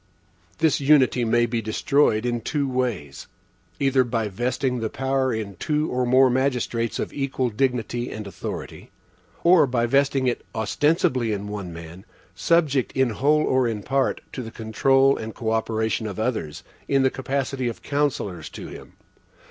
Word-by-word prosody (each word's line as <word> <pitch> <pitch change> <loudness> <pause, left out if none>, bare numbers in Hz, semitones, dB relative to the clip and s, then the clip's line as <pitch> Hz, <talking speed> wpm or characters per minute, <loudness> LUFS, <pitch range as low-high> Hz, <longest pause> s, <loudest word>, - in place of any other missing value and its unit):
This 160 -1 +2
unity 135 -3 +4
may 120 +1 +3
be 115 -1 -2
destroyed 110 +1 +1
in 120 -1 -1
two 140 +4 -1
ways: 120 - -3 0.5
either 135 -2 +3
by 115 -3 -2
vesting 125 +4 -1
the 110 -1 -2
power 135 +1 0
in 110 -4 -4
two 150 - -1
or 125 0 0
more 130 +2 +6
magistrates 125 -3 0
of - - -4
equal 135 -3 -1
dignity 120 0 -1
and 110 -1 -6
authority; 100 - -7 0.5
or 170 -4 +6
by 120 -2 +1
vesting 135 +1 +2
it 125 -1 -1
ostensibly 125 - +1
in 105 -1 -3
one 100 -4 -5
man, 85 +2 -10 0.3
subject, 150 -6 +1
in 130 -3 +2
whole 150 +7 +2
or 130 -3 +2
in 110 -3 -3
part, 135 0 0
to 130 - -4
the 115 - -7
control 135 +5 +2
and 110 0 -6
co 110 -2 -2
operation 110 0 -1
of 100 0 -6
others, 110 -10 -3 0.2
in 135 -1 +2
the 130 - +3
capacity 135 -1 -2
of 115 - -5
counsellors 130 - -2
to - - -9
him. - - -11
125 Hz, 160 wpm, -24 LUFS, 110-135 Hz, 0.5 s, more